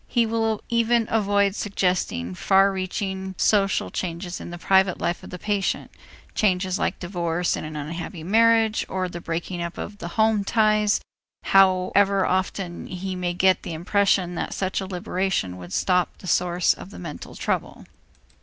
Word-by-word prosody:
He 235 Hz, -2 st, +2 dB
will 225 Hz, -1 st, -1 dB
even 235 Hz, 0 st, +2 dB
avoid 200 Hz, -2 st, +2 dB
suggesting 180 Hz, -, -1 dB
far 195 Hz, -, +4 dB
reaching 190 Hz, 0 st, -3 dB
social 200 Hz, -2 st, +2 dB
changes 175 Hz, 0 st, -4 dB
in -, -, -7 dB
the 175 Hz, -, -7 dB
private 190 Hz, +1 st, +3 dB
life 170 Hz, +1 st, -1 dB
of -, -, -11 dB
the 180 Hz, -, -7 dB
patient, 200 Hz, +1 st, -1 dB, 0.4 s
changes 185 Hz, -2 st, +1 dB
like -, -, -1 dB
divorce 175 Hz, -1 st, -1 dB
in -, -, -5 dB
an 155 Hz, 0 st, -7 dB
unhappy 165 Hz, +3 st, -6 dB
marriage 225 Hz, +3 st, +3 dB
or 185 Hz, -1 st, -1 dB
the 175 Hz, -1 st, -7 dB
breaking 170 Hz, +2 st, -4 dB
of 175 Hz, +4 st, -6 dB
the -, -, -5 dB
home 220 Hz, +2 st, +2 dB
ties, 215 Hz, 0 st, +2 dB, 0.4 s
however 195 Hz, +1 st, +4 dB
often 185 Hz, -1 st, -2 dB
he 185 Hz, +1 st, -5 dB
may 180 Hz, -1 st, -2 dB
get 185 Hz, +1 st, +3 dB
the 170 Hz, -, -6 dB
impression 180 Hz, +1 st, +1 dB
that -, -, -3 dB
such 190 Hz, 0 st, -1 dB
a 190 Hz, -, -5 dB
liberation 180 Hz, -, -2 dB
would 90 Hz, -1 st, -10 dB
stop 180 Hz, -, +1 dB
the -, -, -13 dB
source 180 Hz, -1 st, +2 dB
of -, -, -11 dB
the -, -, -11 dB
mental 165 Hz, -5 st, -8 dB
trouble. -, -, -3 dB
190 Hz, 160 wpm, -24 LUFS, 175-200 Hz, 0.4 s, far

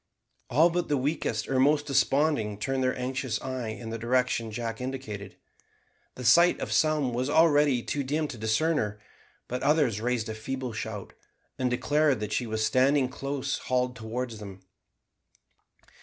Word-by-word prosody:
All 160 Hz, +7 st, +4 dB
but 175 Hz, 0 st, -1 dB
the 145 Hz, -, +1 dB
weakest 130 Hz, -5 st, -1 dB
or 130 Hz, -1 st, +1 dB
most 145 Hz, +2 st, +3 dB
desponding 140 Hz, -5 st, +1 dB
turned 130 Hz, +4 st, -1 dB
their 130 Hz, -, 0 dB
anxious 130 Hz, -2 st, -2 dB
eyes 125 Hz, -4 st, -4 dB
in 115 Hz, -2 st, -7 dB
the 115 Hz, -, -4 dB
direction 120 Hz, -1 st, 0 dB
Jack 115 Hz, +1 st, -4 dB
indicated. 125 Hz, -7 st, -6 dB, 0.8 s
The 125 Hz, -, -7 dB
sight 170 Hz, +10 st, +6 dB
of -, -, -4 dB
some 155 Hz, -5 st, +2 dB
was 125 Hz, +3 st, -1 dB
already 145 Hz, -5 st, +4 dB
too 145 Hz, -, -2 dB
dim 150 Hz, +3 st, -1 dB
to 120 Hz, -, -7 dB
discern 150 Hz, +10 st, +1 dB
her, 105 Hz, -1 st, -3 dB, 0.5 s
but 125 Hz, +1 st, -3 dB
others 145 Hz, -9 st, +2 dB
raised 120 Hz, -1 st, -1 dB
a 110 Hz, -, -4 dB
feeble 130 Hz, +2 st, -5 dB
shout, 110 Hz, -2 st, -6 dB, 0.5 s
and 130 Hz, -1 st, +1 dB
declared 145 Hz, +2 st, +2 dB
that 105 Hz, 0 st, -3 dB
she 120 Hz, -, -1 dB
was 110 Hz, 0 st, 0 dB
standing 130 Hz, +1 st, +3 dB
close 140 Hz, 0 st, -3 dB
hauled 125 Hz, 0 st, -1 dB
towards 115 Hz, 0 st, -5 dB
them. 100 Hz, -2 st, -9 dB
130 Hz, 160 wpm, -28 LUFS, 110-140 Hz, 0.8 s, sight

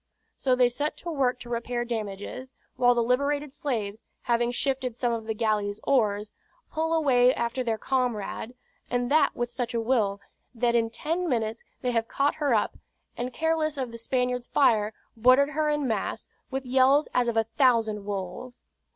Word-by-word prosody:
So 255 Hz, -2 st, +1 dB
they 250 Hz, -1 st, +5 dB
set 290 Hz, +5 st, -2 dB
to 340 Hz, -, -5 dB
work 255 Hz, -4 st, +1 dB
to 240 Hz, -, -9 dB
repair 240 Hz, 0 st, -2 dB
damages; 230 Hz, +3 st, -5 dB, 0.2 s
while 245 Hz, -1 st, +4 dB
the 235 Hz, -, +2 dB
liberated 280 Hz, +3 st, 0 dB
slaves, 225 Hz, -8 st, -3 dB, 0.2 s
having 240 Hz, 0 st, +1 dB
shifted 255 Hz, -1 st, -1 dB
some 240 Hz, -1 st, 0 dB
of 225 Hz, -1 st, -4 dB
the 220 Hz, -, -1 dB
galley's 210 Hz, -2 st, 0 dB
oars, 210 Hz, -5 st, +1 dB, 0.4 s
pull 320 Hz, 0 st, -1 dB
away 255 Hz, -6 st, +4 dB
after 235 Hz, +2 st, -1 dB
their 225 Hz, -2 st, -1 dB
comrade; 245 Hz, -2 st, -2 dB, 0.3 s
and 245 Hz, 0 st, -1 dB
that 300 Hz, -1 st, +4 dB
with 240 Hz, 0 st, -2 dB
such 245 Hz, -1 st, -3 dB
a -, -, +2 dB
will, 220 Hz, -4 st, +1 dB, 0.4 s
that 235 Hz, 0 st, +1 dB
in 230 Hz, -1 st, +2 dB
ten 330 Hz, +9 st, -2 dB
minutes 225 Hz, -2 st, -1 dB, 0.2 s
they 250 Hz, -, +1 dB
have 230 Hz, -1 st, 0 dB
caught 280 Hz, +4 st, +1 dB
her 285 Hz, -2 st, +2 dB
up, 220 Hz, -3 st, +1 dB, 0.4 s
and 245 Hz, +1 st, -3 dB
careless 315 Hz, 0 st, 0 dB
of 255 Hz, -3 st, -3 dB
the 230 Hz, -, -8 dB
Spaniard's 250 Hz, +1 st, -1 dB
fire, 220 Hz, -6 st, +3 dB, 0.2 s
boarded 255 Hz, +5 st, +5 dB
her 305 Hz, 0 st, 0 dB
en 295 Hz, -2 st, 0 dB
masse, 215 Hz, -4 st, -2 dB, 0.2 s
with 265 Hz, 0 st, -3 dB
yells 265 Hz, +3 st, +4 dB
as 250 Hz, -1 st, +2 dB
of 235 Hz, -1 st, 0 dB
a 225 Hz, -, +4 dB
thousand 225 Hz, -3 st, +2 dB
wolves. 200 Hz, +5 st, -6 dB
245 Hz, 175 wpm, -27 LUFS, 225-270 Hz, 0.4 s, they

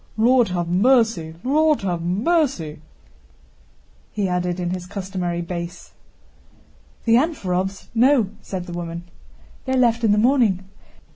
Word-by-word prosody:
"Lord 240 Hz, +1 st, +4 dB
have 175 Hz, -2 st, -2 dB
mercy, 195 Hz, -4 st, +2 dB
Lord 305 Hz, +3 st, +2 dB
have 175 Hz, -3 st, -1 dB
mercy!" 190 Hz, -, 0 dB, 1.3 s
he 205 Hz, -2 st, -1 dB
added 180 Hz, 0 st, -1 dB
in 175 Hz, -1 st, -2 dB
his 180 Hz, -1 st, -5 dB
customary 185 Hz, -3 st, -3 dB
bass. 170 Hz, 0 st, -7 dB, 1.1 s
"The 230 Hz, -, +3 dB
Anférovs? 195 Hz, -, -1 dB
No," 240 Hz, -3 st, +3 dB
said 185 Hz, -2 st, -5 dB
the 175 Hz, -, -8 dB
woman. 170 Hz, 0 st, -5 dB, 0.6 s
"They 260 Hz, -, -1 dB
left 240 Hz, -2 st, +2 dB
in 220 Hz, -, +4 dB
the 205 Hz, -, +3 dB
morning. 215 Hz, -6 st, +2 dB
190 Hz, 125 wpm, -22 LUFS, 175-245 Hz, 1.3 s, Lord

